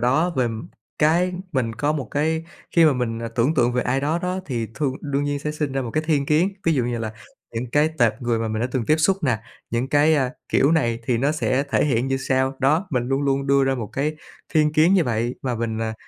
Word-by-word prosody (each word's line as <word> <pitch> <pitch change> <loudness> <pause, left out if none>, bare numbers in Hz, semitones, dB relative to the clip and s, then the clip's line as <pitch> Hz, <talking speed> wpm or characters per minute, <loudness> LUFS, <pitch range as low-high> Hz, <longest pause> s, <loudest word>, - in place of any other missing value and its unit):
đó, 135 +9 +2
về, 130 - +3
ừm, 115 +7 -4 0.3
cái 170 +4 +3 0.2
mình 120 -5 -1
có 145 +7 0
một 140 -7 -4
cái 160 +2 0 0.3
khi 165 - +7
mà 155 - +5
mình, 120 -3 -2
ờ, 115 0 -4
tưởng 120 +6 +1
tượng 120 -3 +2
về 125 - +1
ai 130 +2 0
đó 150 +4 0
đó, 180 +1 -2
thì 120 -5 -2
thương 140 -4 -1
đương 140 0 -1
nhiên 145 0 -1
sẽ 150 +2 -3
sinh 150 -3 -3
ra 135 0 -1
một 120 - -5
cái 155 - 0
thiên 145 -4 +1
kiến, 165 +7 +2
ví 165 -2 +3
dụ 125 - +1
như 120 -1 -2
là 110 -1 -4 0.4
những 115 +1 -4
cái 150 +1 +4
tệp 120 +2 +2
người 120 -1 0
mà 115 0 -2
mình 110 0 -2
đã 125 - 0
từng 120 -4 -1
tiếp 155 - +4
xúc 175 +5 +3
nè, 125 -5 +2 0.3
những 120 +3 -1
cái, 145 +3 +4
à, 135 -4 +1 0.2
kiểu, 140 +4 +3
này 120 -8 +1
thì 120 -2 +1
nó 140 +5 +1
sẽ 140 -3 0
thể - - +2
hiện 125 -4 +1
như 135 - +1
sau. 135 0 0
Đó, 155 +8 +2
mình 125 -4 0
luôn 135 +1 0
luôn 140 0 0
đưa 140 0 +4
ra 135 0 +1
một 115 -4 -4
cái 150 +3 -1 0.4
thiên 150 -1 +3
kiến 160 +5 +4
như 180 -4 +4
vậy 120 0 -1
và 125 -2 -1
mình, 115 -1 -2
à, 110 0 -2
135 Hz, 265 wpm, -22 LUFS, 120-150 Hz, 0.4 s, khi